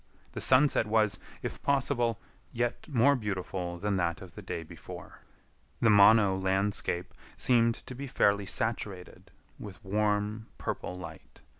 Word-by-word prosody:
The - - -6
sunset 130 -3 +4
was, 105 -2 +2 0.2
if - - -5
possible, 125 -5 +1 0.3
yet 120 0 -2
more 140 -1 +4
beautiful 95 -5 -4
than 100 +1 -1
that 85 0 -1
of 95 -3 -12
the - - -9
day 85 - -5
before. 80 - -11 0.6
The 110 - +4
Mono 100 -1 +6
landscape 95 -2 -1 0.2
seemed 115 -2 +3
to - - -8
be 140 +3 -6
fairly 100 -5 +2
saturated 100 -4 -3 0.3
with 105 +1 -10
warm, 105 +2 0
purple 90 - -4
light. 80 -8 -11
105 Hz, 135 wpm, -30 LUFS, 95-115 Hz, 0.6 s, Mono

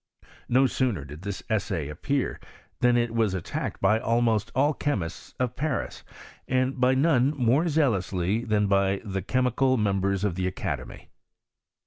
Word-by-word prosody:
No 130 +2 +4
sooner 120 - 0
did 75 +3 -10
this 95 -2 -5
essay 90 -8 -1
appear 130 - -2 0.4
than. 120 0 +4
it 120 -1 0
was 110 -4 +1
attacked 90 - -4
by 110 - +3
almost 115 -2 +1
all 145 +4 +3
the - - -23
chemists 95 - -3
of 125 -1 -1
Paris, 145 -2 -3 0.4
and 130 0 0
by 130 +1 +4
none 140 -1 +3
more 130 +7 +3
zealously 110 - +1
than 105 -3 +1
by 100 -1 +2
the 95 -2 -3
chemical 130 +4 +1
mem 100 -3 +1
bers 100 0 0
of 105 -4 +1
the 90 +1 -1
academy. 95 - -5
115 Hz, 155 wpm, -26 LUFS, 95-130 Hz, 0.4 s, No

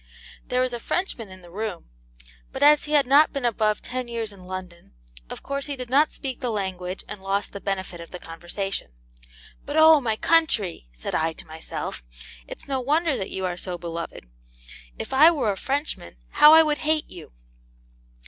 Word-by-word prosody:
There 250 0 +1
was 255 -1 0
a 240 - -3
Frenchman 240 - -2
in 185 -1 -13
the 175 - -14
room, 200 - -5 0.6
but - - -2
as 295 0 +6
he 300 - -4
had 290 -2 +5
not 285 +4 +5
been 275 -3 -3
above 215 -2 +1
ten 255 -1 -4
years 230 -3 -4
in 185 -2 -14
London, 185 - -8 0.4
of - - -8
course 280 0 -3
he 285 - -3
did 250 -2 -8
not 295 +3 +4
speak 265 -3 -6
the 250 - -2
language, 190 -3 -3
and 205 -1 -8
lost 195 +1 -2
the 200 - -7
benefit 190 -3 -3
of 170 - -10
the 180 - -7
conversation. 175 - -5 0.7
'But, 290 +2 -4
O 315 -1 +8
my 225 -4 0
country!' 220 - +1
said - - -6
I 160 0 +1
to - - -11
myself, 160 - -6 0.5
it's - - -9
no 270 -1 -1
wonder 300 +4 +1
that 190 - -4
you 190 0 -3
are 180 -1 -2
so 180 -1 -4
beloved! 170 - -6 0.7
If - - -6
I 300 +5 +8
were 285 -11 +1
a - - -3
Frenchman, 270 - -3
how 300 - +7
I 320 - +8
would 300 -2 0
hate 310 0 0
you!' 175 -3 -12
220 Hz, 195 wpm, -24 LUFS, 185-280 Hz, 0.7 s, O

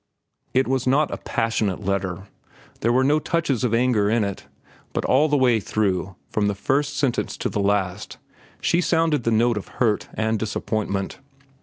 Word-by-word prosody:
It 130 +1 +3
was 130 -1 0
not 140 +3 +3
a - - -3
passionate 110 -3 -1
letter. 95 -1 -2 0.6
There 115 - +1
were 130 +2 +3
no 145 +3 +3
touches 150 -7 -1
of 125 - +1
anger 115 -4 +2
in 115 0 +2
it. 100 -1 -5 0.5
But - - -1
all 145 +4 +3
the 145 - +3
way 125 -4 +4
through, 95 -3 -1 0.2
from 105 -1 +1
the 100 - 0
first 140 +8 0
sentence 135 -4 -1
to - - -2
the - - -3
last, 100 -1 -1 0.6
was 175 +1 +3
sounded 160 -6 +2
the - - +3
note 115 +1 +3
of 100 - -5
hurt 110 -4 +1
and 110 0 0
disappointment. 105 -2 -2
115 Hz, 175 wpm, -23 LUFS, 100-130 Hz, 0.6 s, way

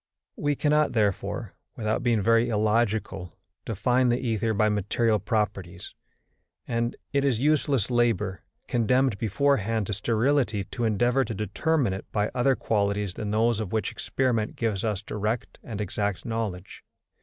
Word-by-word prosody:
We 145 0 0
cannot 150 -1 +2
therefore, 105 -5 -1 0.2
without 110 -1 -1
being 115 -4 +2
very 115 +2 +4
illogical, 105 -4 0 0.3
define 125 +4 +2
the 120 - +2
ether 115 -3 0
by 110 0 +2
material 105 +2 +1
properties, 100 -4 -2 0.7
and 115 0 -1 0.2
it 140 -1 +2
is 130 -5 +2
useless 140 -5 +1
labour, 115 -6 +1 0.3
condemned 125 -1 +2
beforehand 115 -2 +1
to 105 - -3
sterility, 115 0 +1
to 120 +5 -3
endeavour 120 +5 +2
to 115 - -5
determine 105 - 0
it 95 - -8
by 105 0 0
other 130 +1 +3
qualities 100 -4 0
than 105 +2 -4
those 110 +1 +2
of 105 -4 -4
which 110 - 0
experiment 120 -5 -1
gives 110 -5 -1
us 105 -3 -1
direct 105 +3 -3
and 110 -4 -6
exact 100 0 -2
knowledge. 110 -6 -4
110 Hz, 145 wpm, -26 LUFS, 105-120 Hz, 0.7 s, very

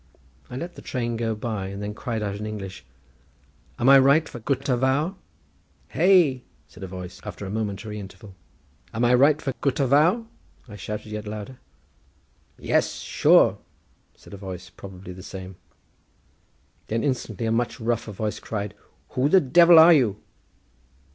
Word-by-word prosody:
I - - -8
let 175 +5 -6
the - - -12
train 120 -4 -3
go 115 -1 -2
by, 105 -3 -4
and 100 +1 -7
then 105 0 -4
cried 110 0 -4
out 100 -1 -2
in 105 +1 -5
English, 95 -9 -7 0.9
"Am 120 - 0
I 135 0 +9
right 140 +5 +4
for 120 - -9
Gutter 135 +2 -1
Vawr?" 135 +8 +1 0.8
"Hey?" 170 -7 +4 0.3
said 75 - -16
a 95 - -5
voice, 90 -1 -9
after 100 - -7
a 95 - -6
momentary 105 0 -4
interval. 100 +1 -11 0.6
"Am 120 +2 +1
I 120 - +4
right 140 +4 +5
for 135 -4 -3
Gutter 140 0 +1
Vawr?" 160 - +3 0.4
I 105 - -10
shouted 105 +1 -6
yet 105 0 -5
louder. 105 +5 -7 1.0
"Yes, - - 0
sure!" - - +3 0.6
said - - -16
a - - -7
voice, 90 -2 -8
probably 95 0 -10
the 95 - -11
same. 95 -1 -9 1.3
Then 115 +1 -1
instantly 120 -6 -2
a 110 - 0
much 115 +1 -1
rougher 115 -1 -2
voice 105 +1 -4
cried, 105 -2 -5 0.4
"Who 135 +2 0
the 190 - +6
Devil 170 +3 +6
are 165 +2 +9
you?" 120 -10 +2
115 Hz, 160 wpm, -24 LUFS, 100-135 Hz, 1.3 s, I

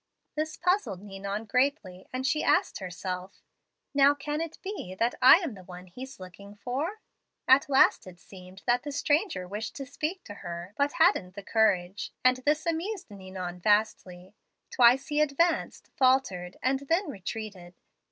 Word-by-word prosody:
This 310 +1 -3
puzzled 360 - 0
Ninon 200 +2 -5
greatly, 250 -7 -1
and 255 +1 -3
she 300 +2 +1
asked 375 +1 +2
herself, 185 0 -6 0.5
'Now 280 0 +5
can 295 +2 -3
it 330 -1 -5
be 380 - -6
that 230 +3 +1
I 260 - +10
am 335 - -4
the 190 -2 -12
one 180 0 -11
he's 255 +8 -10
looking 200 +2 -12
for?' 280 - -4 0.5
At 275 +3 +5
last 270 -7 +4
it 180 -1 -12
seemed 185 +1 -14
that 245 +1 +2
the 290 - -6
stranger 290 - 0
wished 205 +2 -5
to 275 - -6
speak 305 +7 -4
to 205 - -9
her, 175 +2 -7
but 285 +1 +1
hadn't 220 - +2
the 200 - -8
courage, 195 -4 +1
and 255 0 +5
this 295 +4 0
amused 340 - -3
Ninon 185 -2 -7
vastly. 195 -2 0 0.4
Twice 250 +3 +5
he 300 0 +2
advanced, 315 +3 0
faltered, 255 -10 +1
and 265 +1 +2
then 345 +4 +2
retreated. 195 -4 -7
240 Hz, 160 wpm, -28 LUFS, 185-295 Hz, 0.5 s, I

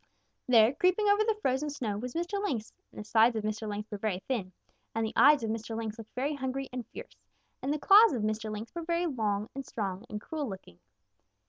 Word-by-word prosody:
There, 230 -1 +6
creeping 365 +7 +2
over 410 +1 +4
the 435 -1 0
frozen 265 +3 +1
snow, 250 -8 -3
was 245 +6 -5
Mr. 350 +4 -2
Lynx, 240 - -3 0.2
and - - -11
the - - -5
sides 225 +2 +4
of 220 - -2
Mr. 215 0 -3
Lynx 210 +1 -5
were 205 - -5
very 205 -3 -1
thin, 215 -9 -2 0.4
and 225 0 +1
the 220 - -4
eyes 290 -3 +6
of 220 - -1
Mr. 225 0 -4
Lynx 220 -1 -4
looked 220 - -12
very 275 +4 -1
hungry 270 -1 -3
and 250 -2 -5
fierce, - - -10 0.5
and 265 +2 -1
the 300 - +1
claws 400 +4 +7
of 235 -5 -2
Mr. 215 0 -2
Lynx 215 +2 -6
were 340 - -4
very 340 +1 0
long 215 -8 -1
and 275 - -5
strong 200 -5 -4
and 210 - -4
cruel 295 +3 -4
looking. 185 - -10
235 Hz, 225 wpm, -30 LUFS, 215-295 Hz, 0.5 s, claws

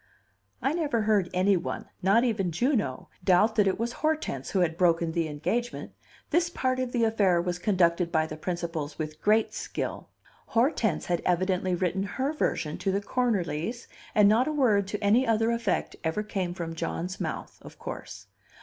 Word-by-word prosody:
I 270 - +2
never 290 -10 0
heard 210 -4 +2
any 190 +2 +3
one, 175 - -3 0.2
not 200 +6 +4
even 205 -7 0
Juno, 205 - 0
doubt 190 +5 +4
that 210 -3 +3
it 190 - +1
was 235 +1 -2
Hortense 305 - -2
who 190 - +1
had 165 -2 +1
broken 170 -1 +2
the 165 -1 0
engagement; 220 +11 -3 0.4
this 340 0 +3
part 255 -6 -1
of 255 -1 -2
the 240 -2 +1
affair 205 -6 +3
was 175 0 -2
conducted 175 -3 +2
by 160 -2 +2
the 155 - -6
principals 165 -3 -4
with 155 -1 -5
great 215 +1 +3
skill. - - -4 0.4
Hortense 230 - +1
had 175 -1 0
evidently 185 +1 +1
written 180 +1 0
her 265 +9 -2
version 155 - -1
to 195 - 0
the 195 - +1
Cornerlys, 210 -2 -1 0.3
and 210 -2 +6
not 225 +6 +4
a - - 0
word 225 -10 +2
to 210 +1 -4
any 230 +6 +4
other 225 0 +2
effect 230 -5 -1
ever 160 +6 -1
came 185 -4 -3
from 165 -2 -4
John's 175 +3 -4
mouth, - - -5
of - - -13
course. - - -8
195 Hz, 175 wpm, -27 LUFS, 175-230 Hz, 0.4 s, and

